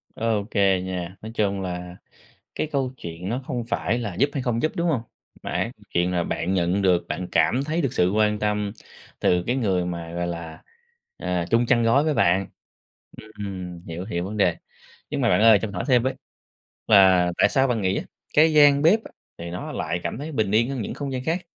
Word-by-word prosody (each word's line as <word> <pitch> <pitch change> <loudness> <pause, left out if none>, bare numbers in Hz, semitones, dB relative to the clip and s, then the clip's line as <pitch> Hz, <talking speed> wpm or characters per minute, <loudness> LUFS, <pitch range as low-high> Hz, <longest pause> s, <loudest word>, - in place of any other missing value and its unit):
OK 110 -2 -1 0.3
nha. 90 -1 -5
Nói 110 +1 -7
chung 100 -3 0
là 90 -1 -5 0.6
cái - - -1
câu 135 -3 0
chuyện 85 -2 -7
nó 120 +5 -2
không 120 -2 -3
phải 120 0 -1
là 110 -6 -4
giúp 140 +11 +2
hay 140 - -2
không 120 -2 -1
giúp, 155 - +1
đúng 170 +1 0
hông? 135 -9 0 0.4
Mà - - -5
á, - - -1 0.2
chuyện 90 +1 +1
là 85 -1 0
bạn 85 +3 -2
nhận 90 +2 +1
được, 90 -2 +3
bạn 90 +4 -4
cảm 130 +3 +2
thấy 160 +3 -1
được 135 - -1
sự 90 +1 +2
quan 105 +1 +2
tâm 105 -1 -1 0.5
từ 90 0 +2
cái 125 - 0
người 95 -7 +1
mà, 85 -1 -5
gọi 85 0 -2
là, 85 -2 -6 0.5
ờ, 90 -1 -2
chung 120 +1 +3
chăn 120 -1 +3
gối 115 +6 +3
với 155 -1 +1
bạn. 95 -4 +3 0.9
Ừm, 95 -3 -6
hiểu, 85 +2 -5
hiểu 90 -4 -3
vấn 105 +3 -5
đề. 90 -5 +2 0.5
Nhưng - - -2
mà - - +2
bạn 90 - +3
ơi, 110 -1 +7
cho 110 - -2
mình 100 - -10
hỏi 90 - -3
thêm 125 -3 +4
với, 130 +1 -1 0.7
là 95 -4 +6
tại - - +5
sao 135 0 +2
bạn 115 -4 0
nghĩ 95 0 +1
á, - - -3 0.3
cái 160 +1 +5
gian 145 -1 +6
bếp 205 +8 +4
á, - - -11 0.3
thì 85 0 -6
nó 90 - -6
lại 85 - -3
cảm - - -4
thấy 150 +3 -6
bình 110 -7 0
yên 115 +4 +3
hơn 135 -4 -3
những - - -5
không 140 -2 -5
gian 130 -1 -4
khác? 170 +5 -1
105 Hz, 225 wpm, -24 LUFS, 90-125 Hz, 0.9 s, ơi